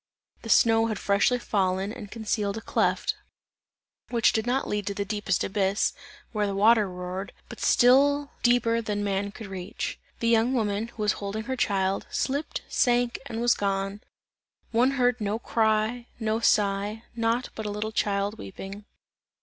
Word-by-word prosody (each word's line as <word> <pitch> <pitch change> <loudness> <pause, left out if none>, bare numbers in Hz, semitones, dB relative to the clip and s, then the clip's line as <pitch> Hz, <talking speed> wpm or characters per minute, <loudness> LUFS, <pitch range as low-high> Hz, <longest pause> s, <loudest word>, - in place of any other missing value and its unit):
The 225 - -8
snow 225 0 +5
had 215 -3 -2
freshly 200 +6 +2
fallen 195 -3 0
and 215 -4 -9
concealed 210 -2 -2
a - - -5
cleft, - - +1 1.0
which 235 -2 +3
did 220 +1 -1
not 260 +2 0
lead 205 -1 -2
to 200 - -2
the 200 - -2
deepest 205 -2 -1
abyss, 195 0 +1 0.4
where 210 -2 0
the 200 - -2
water 210 0 +4
roared 180 +2 -6 0.2
but - - -9
still 280 +3 +4
deeper 235 -1 +3
than 210 -2 -2
man 200 0 -1
could 220 - -9
reach. 190 -1 -5 0.2
The 230 - 0
young 230 +3 +3
woman, 215 -1 0
who 230 -2 -6
was 210 - +3
holding 205 +2 -3
her 260 +3 -3
child, 195 -4 0
slipped, 285 +3 -2
sank 245 -1 +1
and 225 -3 -4
was 240 0 +4
gone; 195 0 -2 0.7
one 240 +3 +4
heard 245 -1 +2
no 205 +1 0
cry, 225 +1 0
no 220 -1 0
sigh, 205 0 +1
nought 230 +2 0
but 220 -1 -5
a - - -2
little 210 +1 -3
child 205 0 -1
weeping. 195 +2 -8
215 Hz, 165 wpm, -26 LUFS, 200-235 Hz, 1.0 s, snow